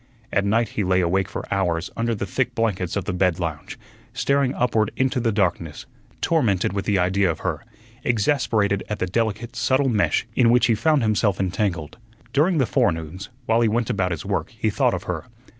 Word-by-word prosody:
At 100 - +2
night 115 +3 +2
he 105 - -2
lay 90 0 +2
awake 95 +2 +1
for - - -5
hours 90 -3 -1
under 115 0 0
the 100 - -3
thick 120 +5 -2
blankets 100 -7 -1
of 100 -3 -2
the - - -2
bed 90 -2 +1
lounge, 80 -4 -4 0.4
staring 140 -2 +1
upward 115 -3 +1
into 130 -1 +1
the 115 -1 +1
darkness, 90 -6 -1 0.4
tormented 105 - +1
with 100 -1 -2
the 100 - +2
idea 95 +1 +2
of 80 - -3
her, - - -3 0.4
exasperated 110 -4 +1
at 105 - -2
the - - -1
delicate, 115 +4 -2
subtle 130 +4 +2
mesh 105 -1 +1
in 120 -3 +4
which 120 +1 +5
he 120 - +3
found 140 +5 +2
himself 105 -3 +1
entangled. 90 -2 -2 0.3
During 160 +5 +3
the 135 - +3
forenoons, 95 - -1 0.2
while 115 0 +2
he 115 - +4
went 120 +2 0
about 95 -5 0
his 85 -3 -4
work, - - -2
he - - 0
thought - - +2
of - - -5
her. - - -4
105 Hz, 195 wpm, -23 LUFS, 90-120 Hz, 0.4 s, which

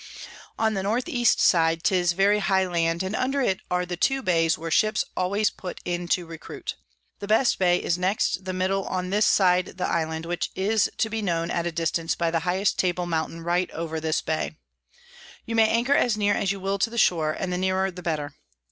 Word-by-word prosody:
On 220 -1 +1
the 195 - -1
N 215 +6 0
E. 240 -1 -3
side 165 -7 +3
'tis 180 -2 +2
very 200 +3 +3
high 190 -1 +2
Land, 170 -1 0
and 190 +3 -3
under 270 +2 0
it 195 -8 +1
are 180 0 0
the 180 0 -4
two 270 +9 0
Bays 165 -4 +2
where 165 +1 -6
Ships 215 +6 +2
always 200 +4 +1
put 180 - -8
in 175 0 -3
to 175 0 0
recruit. 165 -1 -7 0.4
The 200 - -6
best 225 +4 +3
Bay 175 -1 +4
is 175 0 -1
next 190 0 0
the 185 - -4
middle 190 +1 -1
on 185 0 -3
this 210 +2 +3
side 180 -1 +2
the 185 - -1
Island, 160 -1 -2
which 175 +1 -2
is 205 +2 +1
to 220 - 0
be 225 0 -2
known 170 -4 -1
at 170 0 -1
a - - -2
distance 165 0 -1
by 170 -1 0
the 165 - +1
highest 190 +3 0
Table 180 -1 0
Mountain 165 0 -3
right 175 +2 0
over 160 -1 -4
this 160 0 -1
Bay. 155 0 -2 0.9
You 230 - -4
may 225 -1 +4
anchor 235 +5 +2
as 240 -6 +2
near 205 -1 +2
as 195 - 0
you 200 - -4
will 195 +1 -2
to 220 - +1
the 235 - -8
shore, 160 -7 +2
and 180 -1 -2
the 180 - -1
nearer 190 +1 0
the 180 0 -9
better. 155 -4 -3
180 Hz, 220 wpm, -25 LUFS, 170-200 Hz, 0.9 s, Bay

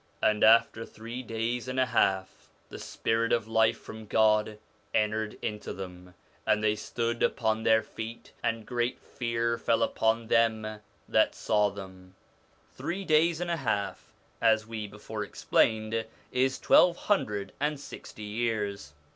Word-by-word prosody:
And 105 -1 +2
after 115 0 +5
three 115 +3 -7
days 115 +1 -3
and 130 0 -2
a 130 - +4
half 95 -5 0 0.2
the - - -8
spirit 115 0 -1
of 115 -2 +1
life 110 0 +3
from 110 -1 -10
God 110 0 +3 0.4
entered 110 0 0
into 105 -2 -4
them, 90 -1 -9 0.3
and 105 0 +2
they 105 0 +3
stood 115 +2 -3
upon 110 -1 +1
their 110 0 +4
feet: 110 +1 -8
and 115 -1 -1
great 120 0 -1
fear 115 -1 -2
fell 115 - +2
upon 115 +1 +1
them 110 -2 +1 0.3
that - - +3
saw 105 -1 +2
them.' 95 -2 -11 0.6
Three 190 +3 -4
days 160 +1 +3
and 175 -1 -2
a 170 - 0
half, 100 -8 -2 0.3
as 110 -1 +4
we 110 -2 -5
before 105 +1 -6
explained, 110 +2 +1 0.2
is 130 +1 +1
twelve 175 -1 +5
hundred 105 - -1
and 150 0 -1
sixty 110 -5 -10
years. 105 -7 -2
110 Hz, 145 wpm, -29 LUFS, 105-115 Hz, 0.6 s, after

